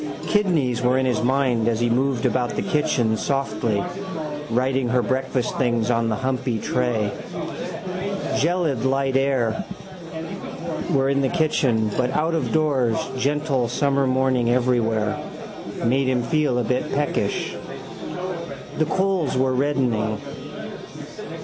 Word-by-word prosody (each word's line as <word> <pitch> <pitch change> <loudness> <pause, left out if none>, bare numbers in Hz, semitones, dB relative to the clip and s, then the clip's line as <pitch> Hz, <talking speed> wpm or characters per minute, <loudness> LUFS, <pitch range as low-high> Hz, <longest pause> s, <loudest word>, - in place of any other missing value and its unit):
Kidneys 160 - +2
were 125 +1 +3
in 130 - +2
his 125 -4 +1
mind 125 -3 +2
as 115 -1 +2
he 120 - +2
moved 125 0 +1
about 125 -1 +1
the - - -1
kitchen 145 -7 +2
softly, 110 -6 0 0.7
righting 130 +2 +1
her 125 0 +2
breakfast 130 -1 0
things 120 -3 +2
on 115 -1 +2
the 110 - +1
humpy 130 -1 -1
tray. 110 -2 0 1.3
Gelid 160 -6 +1
light 135 0 +1
and - - +7
air 130 -5 +1 1.2
were 135 0 +3
in 140 0 +2
the 135 - +2
kitchen 130 -9 +2
but 125 -1 +2
out 160 +2 +1
of 135 -8 0
doors 135 -8 +2 0.2
gentle 140 -1 +1
summer 140 +1 +2
morning 130 -2 +2
everywhere. 115 -4 +2 0.7
Made 130 +3 +3
him 125 -2 +2
feel 150 -5 +1
a 125 - +2
bit 125 +3 -1
peckish. 145 +1 0 1.2
The 155 - +4
coals 185 -5 +1
were 130 0 +2
reddening. 125 -6 +1
130 Hz, 130 wpm, -23 LUFS, 120-140 Hz, 1.3 s, and